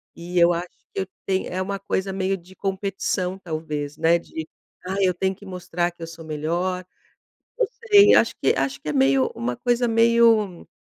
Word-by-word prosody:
E 175 +1 -6
eu 170 0 +6
acho 175 +1 -3 0.3
que - - -1
eu 190 - -4 0.2
tem 190 -1 0
é 185 +1 -3
uma 195 +1 -3
coisa 190 0 -2
meio 195 0 0
de 185 +2 -17
competição, 195 -1 -2
talvez, 155 -4 -4
né, 165 +1 +3
de: 160 -1 -7 0.4
"Ah, 190 - -3
eu 185 -2 +3
tenho 190 +2 0
que 205 - -15
mostrar 175 -2 -2
que 170 -1 -12
eu - - -5
sou 165 0 -10
melhor". 175 +4 -2 0.7
Não 475 - +3 0.2
sei, 410 0 +8
acho 225 - +4
que 135 - +3
acho 135 0 -1
que - - -7
é 150 - 0
meio 135 -1 +3
uma 120 +1 -3
coisa 245 0 +1
meio, 230 -5 +3
180 Hz, 195 wpm, -23 LUFS, 165-195 Hz, 0.7 s, sei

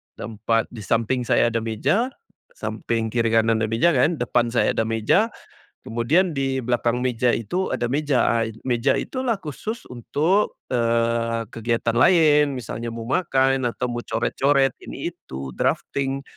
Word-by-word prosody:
ada - - -8
4. 115 +1 0
Di 115 - -9
samping 115 +4 0
saya 120 - +3
ada 115 - 0
meja, 130 - 0 0.5
samping 115 - -3
kiri 115 -1 +1
kanan 115 0 +3
ada 110 - 0
meja 115 +11 +3
kan, 150 +5 +2
depan 120 -3 +1
saya 120 +1 +2
ada 110 - -1
meja, 115 - +2 0.6
kemudian 145 +11 +1
di 135 -1 -1
belakang 120 0 0
meja 125 -1 +1
itu 180 - -2
ada 120 0 -2
meja. 145 -1 +1 0.2
A 115 - +1 0.2
meja 125 +1 +1
itulah 255 -3 -1
khusus 215 - -5
untuk, 155 - 0
eee, 115 -1 +1
kegiatan 115 0 -1
lain 150 -2 +5
misalnya 115 -1 -5
mau 115 - -6
makan 135 -2 +1
atau 125 +1 -2
mau 120 0 -4
coret-coret 135 +3 +1
ini - - -4
itu, 65 0 -8
drafting. 135 0 -1
120 Hz, 150 wpm, -23 LUFS, 115-140 Hz, 0.6 s, lain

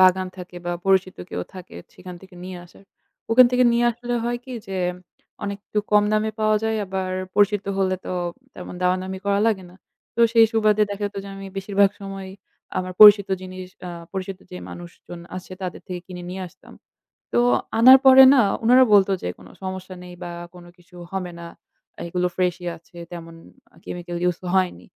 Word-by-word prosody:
বাগান 185 0 +4
থাকে 180 -1 -10
বা 175 - -1
পরিচিত 190 -1 +2
কেউ - - -3
থাকে, 185 - -11 0.2
সেখান 180 -1 -10
থেকে 190 -1 -15
নিয়ে 185 -1 -7
আসার।" 175 +3 -19 0.5
ওখান 250 +2 +8
থেকে 250 0 +3
নিয়ে 235 +1 +2
আসলে 240 +1 -4
হয় 240 0 -1
কি? 260 - -9
যে 180 -2 -2 0.5
অনেকটুকু 200 +1 -4
কম 210 0 +5
দামে 215 0 +1
পাওয়া 215 0 +3
যায় 220 0 0
আবার 190 0 -3 0.2
পরিচিত 205 0 +3
হলে 190 -1 +1
তো, - - -3 0.4
তেমন 180 0 -9
দামা-দামি 185 +1 0
করা 200 0 +2
লাগে 205 -5 0
না। 180 - -18 0.4
তো - - -1
সেই 230 -1 +7
সুবাদে 215 -1 +3
দেখা 205 0 -4
যেত 205 - -9
যে, - - -8
আমি 195 - -8
বেশিরভাগ 200 0 +2
সময়ই 195 -1 -7 0.5
আমার 185 0 -4
পরিচিত 205 -2 +9
জিনিস 185 0 -8 0.2
আ - - -5 0.2
পরিচিত 190 0 -5
যে 180 - -7
মানুষজন 175 0 -10 0.2
আছে 185 0 -9
তাদের 180 - -5
থেকে 180 -1 -5
কিনে 180 -1 -8
নিয়ে 190 0 -5
আসতাম। - - -18 0.6
তো 120 - +3 0.4
আনার 260 +3 +10
পরে 265 0 +10
না, 265 - +5 0.2
উনারা 250 +3 +6
বলত 200 -1 +6
যে, - - -4
"কোন 95 - -15 0.2
সমস্যা 185 0 -6
নেই 180 0 -11
বা 175 - -6 0.2
কোনো 175 -1 -13
কিছু 180 +1 -21 0.2
হবে 185 -2 -4
না। 170 - -8 0.6
এগুলো 180 +1 0
ফ্রেশই 180 -1 -1
আছে। 170 +1 -20
তেমন 165 -1 -9 0.4
আ - - -23
chemical 175 0 -6
use 175 - -5
ক - - -8
হয়নি।" 185 -1 0
190 Hz, 185 wpm, -23 LUFS, 180-205 Hz, 0.6 s, আনার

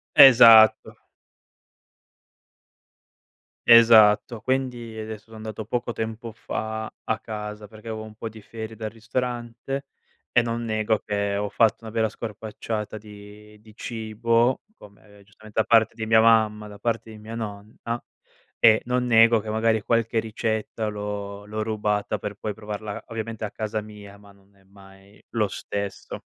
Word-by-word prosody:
Esatto. 115 -4 +8 2.7
Esatto. 115 -1 +7
Quindi, 125 -2 -3
adesso, 110 -1 -7
so - - -11
andato 110 0 -7
poco 120 +2 -2
tempo 115 +1 -5
fa 110 0 -5 0.2
a 110 - -1
casa, 105 -1 -7
perché 110 +2 -12
avevo 110 -1 -5
un 110 0 -12
po' 115 +1 -6
di 110 0 -13
ferie 110 +1 -8
dal 110 -1 -4
ristorante 120 +3 -4 0.4
e 120 - +5
non 115 0 -3
nego 110 -1 0
che 100 -1 -2
ho 105 0 -2
fatto 115 +1 +2
una 110 - -8
vera 110 0 +1
scorpacciata 110 0 -6
di 105 0 -14
di 110 0 -18
cibo, 115 +2 0
come, 105 - -18
giustamente, 105 +1 -7
da 110 - +3
parte 115 -1 +4
di 110 -1 -4
mia 110 0 +5
mamma, 110 -2 +3
da 105 0 -12
parte 115 +1 -2
di 110 - -11
mia 110 +2 -9
nonna, 110 +2 -6 0.6
e 110 -1 +6
non 125 0 0
nego 115 -1 +6
che, 110 0 -7
magari, 110 +1 +1
qualche 115 +1 +1
ricetta 110 0 -2
l'ho 105 -1 -5
l'ho 110 +1 -4
rubata 105 -1 -1
per 105 +1 -5
poi 105 +1 -5
provarla, 105 0 -7
ovviamente, 115 0 -5
a 105 - -5
casa 110 0 -3
mia, 105 -1 -12
ma 100 0 -17
non 100 0 -27
è 95 - -26
mai 95 +1 -19
lo 110 -2 +2
stesso. 100 0 -6
110 Hz, 150 wpm, -24 LUFS, 105-115 Hz, 2.7 s, Esatto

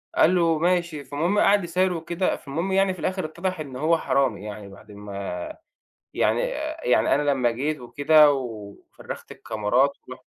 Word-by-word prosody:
قال 180 +4 +4
له: 165 -3 +2
"ماشي". 175 -4 0
فالمهم 170 +8 0
قعد 200 -1 +4
يسايره 180 +1 0
وكده 170 +3 -1
فالمهم 165 +7 -4
يعني 195 0 +2
في 180 - -12
الآخر 185 +2 -2
اتضح 175 +2 -4
إن 140 -4 -7
هو 160 +5 +2
حرامي 130 -10 0
يعني 105 -1 -8
بعد 105 +2 -15
ما 100 0 -10 1.0
يعني، - - +1 0.4
يعني - - +3
أنا 145 0 +1
لمّا 125 -3 +1
جيت 145 +5 -2
وكده 145 +5 +4
و 110 -6 -6 0.2
فرّغت - - -9
الكاميرات 120 +6 0 0.2
ورُحت - - -10
150 Hz, 160 wpm, -24 LUFS, 125-175 Hz, 1.0 s, قال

